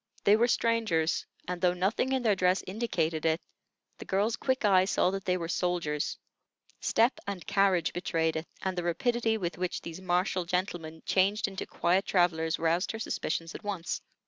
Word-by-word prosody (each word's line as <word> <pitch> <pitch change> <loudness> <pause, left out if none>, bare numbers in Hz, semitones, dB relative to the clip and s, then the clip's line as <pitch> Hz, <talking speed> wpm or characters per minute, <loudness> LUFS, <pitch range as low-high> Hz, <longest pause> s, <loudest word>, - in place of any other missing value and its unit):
They 205 - +6
were 235 +2 +3
strangers; 225 -10 +1 0.2
and 180 -1 -4
though 180 -1 +3
nothing 195 +8 0
in 260 -2 +1
their 215 -3 +3
dress 185 0 +2
indicated 175 -7 -1
it, 160 0 +2 0.6
the - - -8
girl's 205 +4 +1
quick 260 -3 0
eye 185 -2 +5
saw 185 -1 +2
that 195 0 -4
they 180 -1 +1
were 170 -2 -4
soldiers; 175 -4 -1 0.6
step 230 +4 +2
and 195 -3 -4
carriage 195 -5 +2
betrayed 165 -2 0
it, 160 +1 -3 0.2
and 190 -1 -1
the 175 - -1
rapidity 225 +6 0
with 175 -4 -4
which 180 -1 -2
these 170 +2 -8
martial 180 0 +1
gentlemen 170 -3 -3
changed 205 +4 +2
into 195 -1 -5
quiet 185 +3 +1
travellers 165 -3 +2
roused 165 +5 +1
her 225 - -5
suspicions 165 -5 -3
at - - -9
once. 195 -5 -3
185 Hz, 175 wpm, -29 LUFS, 170-205 Hz, 0.6 s, They